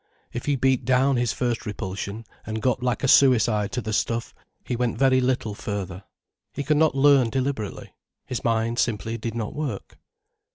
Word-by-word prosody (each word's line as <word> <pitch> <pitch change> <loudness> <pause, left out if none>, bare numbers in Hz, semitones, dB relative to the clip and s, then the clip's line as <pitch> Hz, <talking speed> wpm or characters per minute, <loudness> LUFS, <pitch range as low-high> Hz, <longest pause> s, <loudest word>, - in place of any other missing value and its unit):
If 120 - -5
he 145 - +2
beat 130 -1 +2
down 130 +2 +3
his 120 -2 +1
first 120 -2 -2
repulsion, 100 +1 -5 0.2
and 110 +1 -4
got 125 +1 0
like 125 -3 -1
a - - +2
suicide 115 -6 +4
to 125 - -1
the 110 0 -4
stuff, 115 +2 -1 0.3
he 125 - -2
went 120 0 -1
very 130 -1 +4
little 125 -4 0
further. 100 -2 -5 0.5
He 140 - -2
could 150 +1 +2
not 155 -3 +3
learn 135 -3 +5
deliberately. 130 -4 -3 0.3
His 125 - -4
mind 115 +1 0
simply 115 0 -1
did 115 +1 -4
not 110 -3 -3
work. 140 -10 -5
120 Hz, 175 wpm, -24 LUFS, 110-130 Hz, 0.5 s, learn